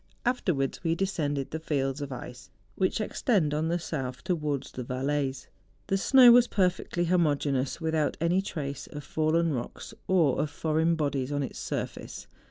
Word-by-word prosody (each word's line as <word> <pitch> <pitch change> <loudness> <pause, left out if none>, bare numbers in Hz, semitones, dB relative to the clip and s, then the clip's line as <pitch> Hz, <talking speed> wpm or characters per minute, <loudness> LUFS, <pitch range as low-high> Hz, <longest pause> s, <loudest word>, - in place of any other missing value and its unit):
Afterwards 180 - 0
we 165 -1 +1
descended 155 -7 -1
the 160 - -3
fields 140 -3 -1
of 140 -1 -5
ice 125 -3 -8 0.2
which 185 - 0
extend 205 - +1
on 155 +2 0
the 170 +1 +1
south 135 -7 -5
towards 150 -6 -2
the 125 - -5
Valais. 135 +2 -2 0.4
The 195 - +1
snow 255 +3 +8
was 245 0 +7
perfectly 180 -3 0
homogeneous, 145 -6 +1
without 160 -3 0
any 170 +3 +2
trace 140 -8 -5
of 145 0 -8
fallen 160 +2 +1
rocks, 120 -2 -6
or 170 -8 +3
of 150 - -1
foreign 160 +3 +1
bodies 140 -3 -1
on 145 -1 0
its - - -6
surface. - - -5
155 Hz, 160 wpm, -28 LUFS, 140-175 Hz, 0.4 s, snow